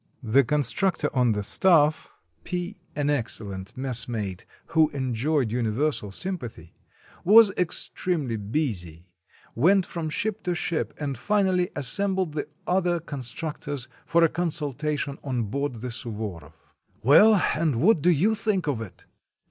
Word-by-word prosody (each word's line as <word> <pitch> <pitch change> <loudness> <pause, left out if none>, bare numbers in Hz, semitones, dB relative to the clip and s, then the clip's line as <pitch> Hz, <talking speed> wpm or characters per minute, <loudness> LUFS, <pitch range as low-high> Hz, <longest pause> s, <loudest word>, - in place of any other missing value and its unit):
The 125 +5 +4
constructor 150 - +1
on 125 -3 +3
the 105 0 -2
staff, 155 - +3 0.3
P 180 +2 -5
(an 145 0 0
excellent 100 -8 -4
messmate, 115 -7 -3 0.2
who 160 -2 +4
enjoyed 130 0 0
universal 120 +1 -1
sympathy), 120 - -6 0.5
was 215 +2 +7
ex 180 -2 -2
tremely 155 -10 -1
busy, 100 - -4 0.4
went 185 - +3
from 165 -2 -4
ship 215 +7 -2
to 180 -1 0
ship, 170 -2 -2
and 145 -2 -3
finally 185 +1 +1
as 145 - -2
sembled 190 - +1
the 150 - -3 0.2
other 180 -1 +1
constructors 145 -1 -5 0.2
for 170 0 +4
a - - +7
consultation 150 -3 -2
on 125 -4 -1
board 130 +1 -3
the 125 0 -4
Suvoroff. 105 - -6 0.5
"Well, 205 - +7 0.2
and 150 -6 0
what 175 - +4
do 175 - +4
you 180 +7 +3
think 210 -4 -1
of 140 -7 -1
it?" 105 -5 -10
145 Hz, 135 wpm, -25 LUFS, 115-175 Hz, 0.5 s, was